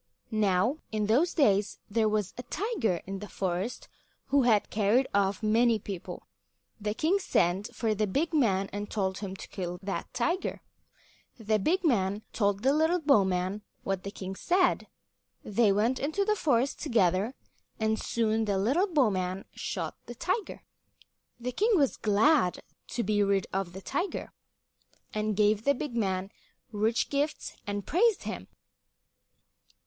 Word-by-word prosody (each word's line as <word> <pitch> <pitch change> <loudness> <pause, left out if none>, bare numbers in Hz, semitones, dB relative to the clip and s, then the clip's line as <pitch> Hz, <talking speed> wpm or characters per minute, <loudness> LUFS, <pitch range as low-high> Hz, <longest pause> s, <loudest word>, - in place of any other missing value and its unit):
Now 215 +5 +2
in 215 -1 0
those 260 +12 +2
days 210 - +3
there 220 0 +2
was 210 -3 -1
a - - -5
tiger 255 - -1
in 195 +1 -5
the 210 - -7
forest 190 +5 -3 0.4
who 280 +1 +4
had 225 -5 +3
carried 220 +5 +3
off 200 +1 +1
many 225 +2 +4
people. 195 -3 -7 0.5
The 210 0 -2
king 345 - +2
sent 190 - 0
for 225 -2 0
the 215 0 0
big 310 - 0
man 200 -10 +2
and 205 0 -4
told 190 -3 -1
him 195 -2 -5
to - - -9
kill 180 -2 -4
that 195 0 -4
tiger. 340 +10 -1 0.8
The 215 -2 +1
big 350 - +1
man 210 - +1
told 200 -1 +1
the 270 +2 +4
little 320 +4 +3
bowman 195 - +2 0.2
what 195 -1 -1
the 200 - -5
king 190 -1 -6
said. 360 - +2 0.6
They 210 0 +3
went 225 +6 +1
into 315 +8 0
the 425 0 +2
forest 275 - +1
together, 210 - +1 0.4
and 220 0 +1
soon 225 -1 0
the 200 -2 0
little 270 - +2
bowman 195 - +1
shot - - -4
the 240 - -7
tiger. 370 - -2 0.8
The 250 +1 -3
king 435 - +2
was 280 -5 +2
glad 215 - +3 0.2
to 240 - -2
be 205 +1 +1
rid 200 -1 +2
of 190 -2 -2
the 190 - -8
tiger, 345 +8 -3 0.8
and 215 -1 -1
gave 210 0 +3
the 280 +2 +3
big 260 -2 -5
man 195 -3 -1 0.4
rich 225 +2 0
gifts 290 +2 -1
and 205 -1 -3
praised 430 +5 +2
him. - - -5
215 Hz, 155 wpm, -29 LUFS, 195-275 Hz, 0.8 s, who